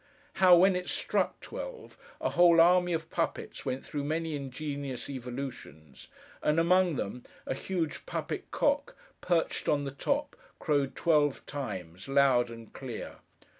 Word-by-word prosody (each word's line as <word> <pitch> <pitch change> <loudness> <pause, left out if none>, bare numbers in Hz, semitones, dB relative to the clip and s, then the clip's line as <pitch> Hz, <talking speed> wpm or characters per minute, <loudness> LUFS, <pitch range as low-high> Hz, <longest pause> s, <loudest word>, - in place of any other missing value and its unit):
How, 180 -1 +9
when 185 +2 +5
it 180 0 -3
struck - - 0
twelve, - - -8 0.2
a - - -1
whole 175 -1 +6
army 180 +1 +5
of 165 -1 -2
puppets 165 -3 -3
went 130 +1 -3
through 145 -2 -4
many 160 +1 -1
ingenious 140 -1 -5
evolutions; 125 - -7 0.3
and, 150 +2 +2
among 180 0 +4
them, 120 +1 -4 0.2
a - - -1
huge 165 - -3
puppet - - -4
cock, 485 +1 0 0.3
perched 175 -2 0
on 145 -1 +2
the 140 - -4
top, 280 - -1 0.2
crowed 140 -4 0
twelve 150 -4 +2
times, 95 - -6
loud 135 -3 +4
and 115 -1 -11
clear. 125 -4 -7
145 Hz, 140 wpm, -30 LUFS, 130-175 Hz, 0.3 s, How